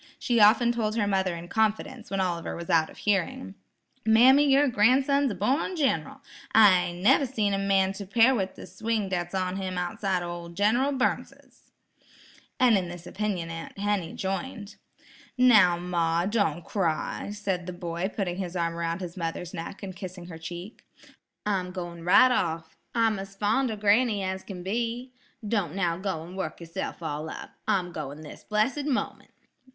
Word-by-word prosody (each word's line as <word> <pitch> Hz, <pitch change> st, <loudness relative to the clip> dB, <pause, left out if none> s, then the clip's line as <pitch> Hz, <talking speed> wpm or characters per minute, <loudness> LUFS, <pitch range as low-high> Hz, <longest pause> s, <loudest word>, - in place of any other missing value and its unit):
She 240 Hz, -3 st, +1 dB
often 220 Hz, +3 st, +6 dB
told 220 Hz, -2 st, -1 dB
her 220 Hz, -3 st, +1 dB
mother 190 Hz, -3 st, 0 dB
in 170 Hz, +1 st, -8 dB
confidence, 220 Hz, +3 st, -1 dB
when 195 Hz, -, -2 dB
Oliver 175 Hz, -3 st, -2 dB
was 170 Hz, +2 st, -5 dB
out 160 Hz, -1 st, +3 dB
of -, -, -14 dB
hearing: 185 Hz, -, -1 dB, 0.5 s
"Mammy, 260 Hz, +6 st, +6 dB
yer 280 Hz, +2 st, +5 dB
gran'son's 265 Hz, +5 st, +3 dB
a -, -, -4 dB
born 260 Hz, -, 0 dB
gin'ral; 260 Hz, -, -1 dB, 0.3 s
I 185 Hz, -5 st, +6 dB
never 235 Hz, +10 st, +3 dB
seen 215 Hz, -5 st, 0 dB
any 195 Hz, 0 st, 0 dB
man 195 Hz, -1 st, +2 dB
to 195 Hz, 0 st, -8 dB
'pare 230 Hz, +6 st, +5 dB
with 190 Hz, -6 st, -2 dB
the -, -, -10 dB
swing 210 Hz, +2 st, -2 dB
dat's 175 Hz, 0 st, -3 dB
on 185 Hz, 0 st, -1 dB
him 185 Hz, -1 st, -4 dB
outside 185 Hz, 0 st, -1 dB
o' 175 Hz, -, -4 dB
ol' 170 Hz, 0 st, -7 dB
Gin'ral 220 Hz, +10 st, +1 dB
Burnsis." 265 Hz, -1 st, -3 dB, 0.9 s
And 240 Hz, -5 st, +5 dB
in 180 Hz, -2 st, -5 dB
this 175 Hz, 0 st, -9 dB
opinion 185 Hz, -4 st, -3 dB
Aunt 165 Hz, +3 st, -8 dB
Henny 200 Hz, -4 st, -1 dB
joined. 205 Hz, +2 st, -4 dB, 0.6 s
"Now, 215 Hz, -9 st, +6 dB
ma, 170 Hz, -1 st, 0 dB
don't 195 Hz, -6 st, 0 dB
cry," 175 Hz, -1 st, -2 dB
said 195 Hz, -4 st, -3 dB
the -, -, -3 dB
boy 175 Hz, +1 st, -3 dB
putting 185 Hz, -4 st, -3 dB
his 185 Hz, -2 st, -4 dB
arm 170 Hz, -1 st, 0 dB
about 170 Hz, +1 st, -3 dB
his 175 Hz, -2 st, -6 dB
mother's 170 Hz, 0 st, -4 dB
neck 170 Hz, +4 st, -7 dB
and 190 Hz, -2 st, -6 dB
kissing 180 Hz, -1 st, -8 dB
her 165 Hz, -2 st, -9 dB
cheek. 175 Hz, +6 st, -8 dB, 0.6 s
"I'm 190 Hz, -3 st, 0 dB
going 175 Hz, -2 st, -7 dB
right 255 Hz, +9 st, +6 dB
off. 165 Hz, -7 st, -1 dB, 0.2 s
I'm 225 Hz, -3 st, +2 dB
as 195 Hz, 0 st, -8 dB
fond 220 Hz, +6 st, +1 dB
of 215 Hz, -2 st, -5 dB
granny 210 Hz, 0 st, +3 dB
as 190 Hz, 0 st, -3 dB
can 180 Hz, -3 st, -8 dB
be. 235 Hz, +5 st, -3 dB, 0.3 s
Don't 200 Hz, -7 st, -1 dB
now 175 Hz, -4 st, +1 dB
go 190 Hz, -4 st, -3 dB
and 175 Hz, +3 st, -10 dB
work 190 Hz, -, -4 dB
yourself 170 Hz, +1 st, -6 dB
all 155 Hz, 0 st, -4 dB
up. -, -, -8 dB, 0.2 s
I'm 190 Hz, -4 st, +1 dB
going 145 Hz, -2 st, -6 dB
this 155 Hz, -, -11 dB
blessed 225 Hz, +7 st, 0 dB
moment." 280 Hz, -4 st, -2 dB
195 Hz, 175 wpm, -27 LUFS, 175-220 Hz, 0.9 s, often